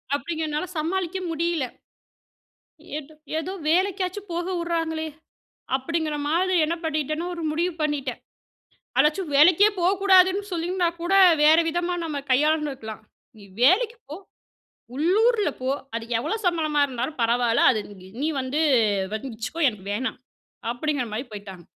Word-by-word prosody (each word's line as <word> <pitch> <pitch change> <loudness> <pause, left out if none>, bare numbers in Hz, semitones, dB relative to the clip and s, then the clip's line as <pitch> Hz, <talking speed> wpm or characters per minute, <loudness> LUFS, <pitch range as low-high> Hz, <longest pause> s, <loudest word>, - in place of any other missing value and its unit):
அப்டிங்கிறனால 310 +2 -3
சமாளிக்க 355 +3 -1
முடியல. 330 -3 0 1.3
ஏதோ 310 +1 -11 0.2
ஏதோ 340 +4 -4 0.2
வேலைக்காச்சும் 375 +2 0
போக 345 +1 -2
உடுறாங்களே 325 -2 -2 0.7
அப்படிங்கிற 310 +3 -2
மாரி 360 +5 +1
என்ன 330 +2 -1
பண்ணிட்டேன்னா, 310 +1 -2
1 335 - -6
முடிவு 340 +3 -1
பண்ணிட்டேன். 285 -4 -2 0.8
அதாச்சும் 305 +4 +2
வேலைக்கே 355 +7 +6
போகக்கூடாதுன்னு 380 +1 +4
சொல்லிருந்தா 350 +1 0
கூட, 345 +3 -1 0.3
வேற 310 +2 +7
விதமா 350 +2 -1
நம்ம 310 -3 -3
கையாண்டு 300 +3 +2
இருக்கலாம். 220 -5 -8 0.4
"நீ 205 - -14 0.2
வேலைக்கு 430 - +4
போ, 300 - -6 0.8
உள்ளூர்ல 420 - +3
போ, 255 - -1 0.3
அது 230 - -4
எவ்வளோ 305 - -2
சம்பளமா 310 -4 +1
இருந்தாலும் 255 +3 -4
பரவால்ல. 235 0 +2
அது 220 - -1 0.2
நீ 185 - -13 0.2
நீ - - +1
வந்து 260 +4 -2 0.5
வச்சுக்கோ 245 +6 -5
எனக்கு 205 -4 -12
வேணாம்." 250 +3 -3 0.5
அப்படிங்குற 285 0 -2
மாரி 245 +6 -4
போய்ட்டாங்க. 195 -4 -9
315 Hz, 125 wpm, -24 LUFS, 270-355 Hz, 1.3 s, வேற